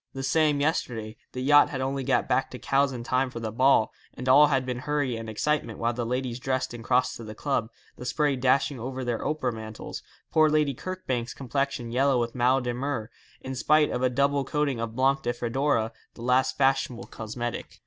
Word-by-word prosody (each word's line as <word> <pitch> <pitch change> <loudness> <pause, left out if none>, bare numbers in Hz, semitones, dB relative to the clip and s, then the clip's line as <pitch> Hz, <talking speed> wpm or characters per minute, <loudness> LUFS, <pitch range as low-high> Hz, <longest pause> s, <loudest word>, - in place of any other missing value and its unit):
The 135 - -5
same 150 +1 +2
yesterday. 115 -8 -1 0.2
The 125 - -4
yacht 145 +2 +6
had 135 - -4
only 135 +1 -2
got 135 +1 +1
back 135 - +1
to 125 - -8
Cowes 135 +2 +1
in 120 -2 -6
time 130 +2 +1
for 120 - -7
the 110 -1 -4
ball, 130 0 +3 0.2
and 125 - -6
all 145 +3 +7
had 135 -3 +1
been 125 -1 -3
hurry 145 -2 -1
and 115 0 -6
excitement 150 +8 -1
while 120 +1 0
the 120 -1 -3
ladies 125 0 -2
dressed 130 -1 -1
and 120 -1 -8
crossed 125 +1 +1
to 115 - -9
the 110 -1 -8
club, 115 -3 -1 0.3
the 125 - -8
spray 145 +1 +1
dashing 130 +1 +1
over 130 +2 -4
their 120 -2 -2
opera 140 -5 -1
mantles, 110 -1 -7 0.3
poor 155 -1 +5
Lady 150 -2 +2
Kirkbank's 135 -7 -4
complexion 135 -2 -2
yellow 130 +1 +3
with 115 -1 -2
mal 130 +2 +3
de 125 -1 -2
mer, 125 -3 -3 0.3
in 130 - -5
spite 150 +3 +3
of 125 - -2
a 130 - +3
double 140 +2 +1
coating 145 -3 -1
of 115 -1 -4
Blanc 135 +2 +2
de 120 -2 -1
Fedora, 120 -1 0 0.2
the 115 - -9
last 130 +1 +2
fashionable 135 -3 +1
cosmetic. 120 +2 -6
130 Hz, 210 wpm, -27 LUFS, 120-140 Hz, 0.3 s, all